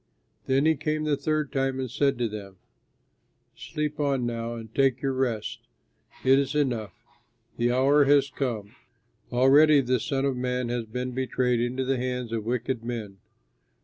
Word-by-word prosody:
Then 135 +2 +2
he 160 - +5
came 155 +1 -2
the 150 -1 +1
third 150 +1 -1
time 135 -1 -1
and 130 - -2
said 140 +2 +1
to 120 -1 0
them, 100 -3 -8 1.0
"Sleep 150 0 -4
on 140 -4 +1
now 115 0 -3
and 115 -1 -9
take 135 -2 +2
your 135 -1 +1
rest. 120 -5 -2 0.7
It 135 +1 +6
is 140 +1 -2
enough; 120 -8 -1 0.6
the 120 +1 +2
hour 140 +3 +4
has 140 -1 +4
come; 120 -6 -3 0.6
already 140 +4 +6
the 125 -1 +1
Son 135 +4 -1
of 135 -2 0
Man 125 -1 -2
has 120 -1 -2
been 125 +3 -4
betrayed 125 -1 0
into 125 +2 -1
the 135 0 0
hands 125 -1 -3
of 110 -2 -3
wicked 120 0 -2
men. 110 -5 -5
130 Hz, 165 wpm, -26 LUFS, 120-140 Hz, 1.0 s, It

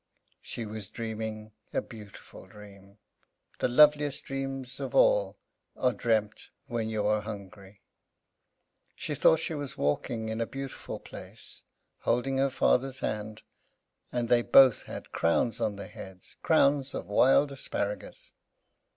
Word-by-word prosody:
She 115 - -6
was 105 -2 -7
dreaming 110 -2 -5 0.2
a - - +4
beautiful 105 -3 -11
dream. 100 -1 -15 0.6
The - - +2
loveliest 145 +2 +4
dreams 135 -2 -5
of - - -4
all - - +4 0.4
are 125 -1 +2
dreamed 110 -1 0 0.2
when 120 -4 -2
you 110 -2 -1
are 105 0 +2
hungry. 100 -1 -10 1.1
She - - -4
thought 160 - +5
she 160 - -3
was 145 -3 -5
walking 110 - -1
in 110 +1 -2
a 115 - -1
beautiful 135 -1 -6
place, - - -9 0.4
holding 135 +3 0
her 135 0 +3
father's 130 0 +1
hand, 105 0 -4 0.7
and 120 -1 -1
they 120 +1 +4
both 130 0 +6
had - - -8
crowns 85 +8 +1
on 105 - 0
their 100 - -7
heads, 95 -4 -11
crowns 140 -3 +3
of - - -4
wild 135 +7 +4
asparagus. 105 -6 -4
115 Hz, 135 wpm, -29 LUFS, 105-135 Hz, 1.1 s, both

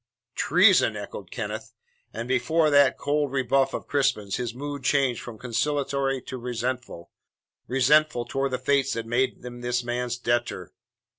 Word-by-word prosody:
"Treason!" - - +4
echoed - - -8
Kenneth. - - -5 0.4
And 115 - -5
before 150 +5 +2
that 140 -2 +5
cold 145 -1 0
rebuff 135 0 +2
of - - -5
Crispin's 135 -9 0
his 120 -2 -3
mood 145 +2 -6
changed 135 -2 +1
from 120 -3 -9
conciliatory 135 +2 -1
to 130 - -7
resentful 120 -6 -4 0.6
resentful 135 0 +3
towards 135 +2 -2
the - - +1
fates 135 +1 +1
that 115 -1 -4
made 125 +2 -1
him 120 0 -8
this 125 0 -1
man's 120 0 -2
debtor. 120 0 -2
130 Hz, 145 wpm, -25 LUFS, 120-140 Hz, 0.6 s, that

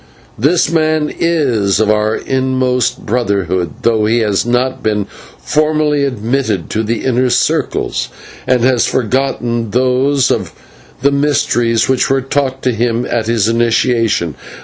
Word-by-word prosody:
This 160 +7 +2
man 155 -2 +1
is 125 - +1
of 110 -1 +3
our 110 +1 +1
inmost 130 -2 -1
Brotherhood, 95 - -1
though 110 -2 +2
he 115 +2 +2
has 105 0 0
not 125 +2 0
been 105 -2 0 0.3
formally 150 -1 +1
admitted 115 -6 -2
to 110 - 0
the 115 +1 -2
inner 130 0 +1
circles, - - 0 0.4
and 125 -2 +2
has 125 -2 +3
forgotten 120 -2 -1
those 130 +3 +1
of - - -2 0.5
the 140 - +4
mysteries 120 -5 +1
which 130 -1 +1
were 135 0 +2
taught 135 -1 -2
to 130 - +2
him 115 +1 -1
at 115 -2 -2
his 115 -3 +1
initiation. 115 - +1
125 Hz, 135 wpm, -14 LUFS, 110-135 Hz, 0.5 s, the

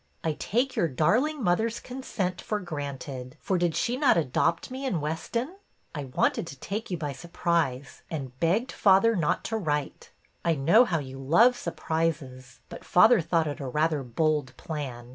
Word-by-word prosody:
I 160 - 0
take 245 - -1
your 170 - +2
darling 245 - +1
mother's 220 +5 +1
consent 230 -8 -4
for 210 - -2
granted, 140 -6 -6
for 185 -2 0
did 175 -2 +1
she 245 +1 0
not 275 - +4
adopt 165 - 0
me 260 +1 -5
in 225 -11 0
Weston? 230 - -3 0.4
I 145 -3 -4
wanted 130 +5 0
to 140 - -8
take 210 - -4
you 180 - -2
by 150 -3 -3
surprise, 160 -3 -2
and 135 -5 -6
begged 195 +10 +1
father 205 +3 +4
not 165 -6 0
to 225 - -2
write. 150 -7 -3 0.3
I 165 -1 +2
know 170 - +5
how 175 -7 0
you 135 -3 -7
love 195 - +5
surprises, 155 - -3
but - - -10
father 215 +3 +5
thought 165 0 +1
it 145 -2 -4
rather 150 +3 0
a - - -6
bold 140 0 -1
plan. 130 -6 -6
165 Hz, 170 wpm, -27 LUFS, 145-210 Hz, 0.4 s, know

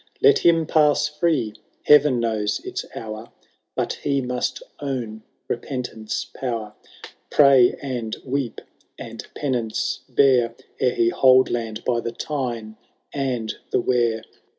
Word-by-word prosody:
Let 430 0 +6
him 165 -1 +4
pass 150 -1 +3
free! 150 -7 0 0.2
— - - -31
^Heaven 150 -3 +6
knows 110 -3 0
its - - -4
hour^— 110 +1 -7 0.5
But - - -1
he 140 -1 +1
must 125 -1 -2 0.2
own 125 -6 -4 0.3
repentance^ 120 -4 -4
power. 115 -5 -4 0.6
Pray 135 -4 +6
and 120 -5 -3
weep, 135 -2 -2 0.4
and 115 -1 -8
penance 120 -6 -1
bear. 125 -4 +3 0.2
Ere 125 - +2
he 115 0 +3
hold 130 +1 +5
land 115 -2 -3
by 120 -2 +1
the 115 - -3
Tyne 120 -5 -4 0.4
and 125 -6 -2 0.2
the - - +2
Wear.' 120 -3 +1
125 Hz, 130 wpm, -23 LUFS, 115-140 Hz, 0.6 s, Let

